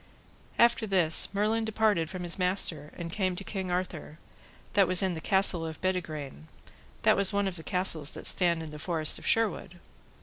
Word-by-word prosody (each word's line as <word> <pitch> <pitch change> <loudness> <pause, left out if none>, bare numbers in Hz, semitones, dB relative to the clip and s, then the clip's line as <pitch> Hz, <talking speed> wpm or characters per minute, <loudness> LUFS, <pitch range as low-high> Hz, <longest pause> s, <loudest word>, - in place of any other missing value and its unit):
After 235 -1 +3
this 175 -5 +2
Merlin 215 +3 0
departed 215 -7 +1
from 185 -1 -6
his 175 +2 -3
master 180 -4 -1
and 170 -1 -6
came 185 -3 -1
to 200 - -6
King 190 -2 -5
Arthur, 175 -4 -4 0.6
that 200 -2 +4
was 185 +1 +2
in 190 -1 0
the 160 - -6
castle 190 -2 +2
of 160 -1 -6
Bedegraine, 155 - -4 0.6
that - - +5
was 200 0 +4
one 200 -1 0
of 190 - -4
the 165 - -8
castles 165 -5 0
that - - -9
stand 170 -3 +3
in 155 - -8
the 150 - -9
forest 160 -2 -1
of - - -8
Sherwood. 210 -5 0
180 Hz, 190 wpm, -28 LUFS, 165-200 Hz, 0.6 s, that